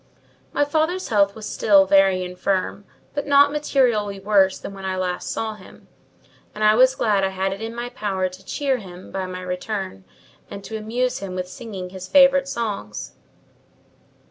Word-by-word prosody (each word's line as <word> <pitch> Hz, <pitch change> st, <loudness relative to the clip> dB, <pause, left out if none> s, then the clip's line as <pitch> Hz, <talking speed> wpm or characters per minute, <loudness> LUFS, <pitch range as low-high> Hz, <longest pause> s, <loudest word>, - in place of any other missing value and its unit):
My 290 Hz, -, +2 dB
father's 320 Hz, +5 st, 0 dB
health 200 Hz, -3 st, +3 dB
was 220 Hz, -1 st, -7 dB
still 195 Hz, -2 st, +4 dB
very 190 Hz, -1 st, +4 dB
infirm, 185 Hz, +2 st, -2 dB, 0.3 s
but 290 Hz, 0 st, -3 dB
not 285 Hz, 0 st, +6 dB
materially 240 Hz, -9 st, +1 dB
worse 195 Hz, -1 st, +3 dB
than -, -, -8 dB
when 195 Hz, 0 st, -10 dB
I 190 Hz, 0 st, -2 dB
last 180 Hz, -1 st, -2 dB
saw 220 Hz, -1 st, -2 dB
him; 210 Hz, -3 st, -16 dB, 0.7 s
and 215 Hz, -, -3 dB
I 215 Hz, 0 st, +6 dB
was 255 Hz, +3 st, +5 dB
glad 205 Hz, -5 st, +1 dB
I -, -, +3 dB
had 190 Hz, 0 st, -2 dB
it 200 Hz, -, -9 dB
in 225 Hz, +1 st, -5 dB
my 240 Hz, +1 st, -4 dB
power 195 Hz, -6 st, -2 dB
to 185 Hz, +1 st, -12 dB
cheer 270 Hz, +5 st, -1 dB
him 185 Hz, -4 st, -11 dB
by 190 Hz, -1 st, -3 dB
my 185 Hz, 0 st, -6 dB
return, 180 Hz, -, -4 dB, 0.5 s
and 200 Hz, -, -8 dB
to 220 Hz, -, -7 dB
amuse 235 Hz, +4 st, -1 dB
him 190 Hz, -2 st, -6 dB
with 180 Hz, 0 st, -3 dB
singing 190 Hz, -2 st, -7 dB
his 185 Hz, -1 st, -8 dB
favourite 275 Hz, +3 st, +5 dB
songs. 210 Hz, -, -4 dB
200 Hz, 175 wpm, -22 LUFS, 190-240 Hz, 0.7 s, not